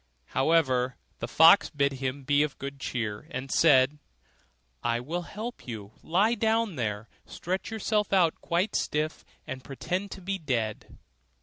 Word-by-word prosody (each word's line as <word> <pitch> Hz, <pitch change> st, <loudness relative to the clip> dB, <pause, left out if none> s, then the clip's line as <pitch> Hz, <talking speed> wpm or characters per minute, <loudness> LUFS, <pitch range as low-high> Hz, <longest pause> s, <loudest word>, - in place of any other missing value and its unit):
However, 130 Hz, -4 st, +2 dB, 0.2 s
the -, -, -3 dB
fox 165 Hz, +5 st, +7 dB
bid 140 Hz, -2 st, +1 dB
him 135 Hz, +1 st, -4 dB
be 145 Hz, +2 st, +3 dB
of 150 Hz, -2 st, -1 dB
good 140 Hz, 0 st, -6 dB
cheer, 115 Hz, -1 st, -3 dB
and 135 Hz, -4 st, -5 dB
said, 145 Hz, -2 st, +4 dB, 0.8 s
'I 120 Hz, 0 st, 0 dB
will 165 Hz, +8 st, -3 dB
help 220 Hz, -, -7 dB
you; 105 Hz, -4 st, -7 dB
lie 200 Hz, +8 st, +2 dB
down 225 Hz, -3 st, +1 dB
there, 110 Hz, -3 st, -3 dB, 0.2 s
stretch 185 Hz, +2 st, -4 dB
yourself 215 Hz, -1 st, 0 dB
out 180 Hz, -5 st, +3 dB
quite 180 Hz, +5 st, 0 dB
stiff, 155 Hz, +1 st, -1 dB, 0.2 s
and 130 Hz, -1 st, -6 dB
pretend 180 Hz, +8 st, -3 dB
to 195 Hz, -, -10 dB
be 195 Hz, +1 st, -3 dB
dead. 115 Hz, -, -3 dB
150 Hz, 145 wpm, -28 LUFS, 130-185 Hz, 0.8 s, fox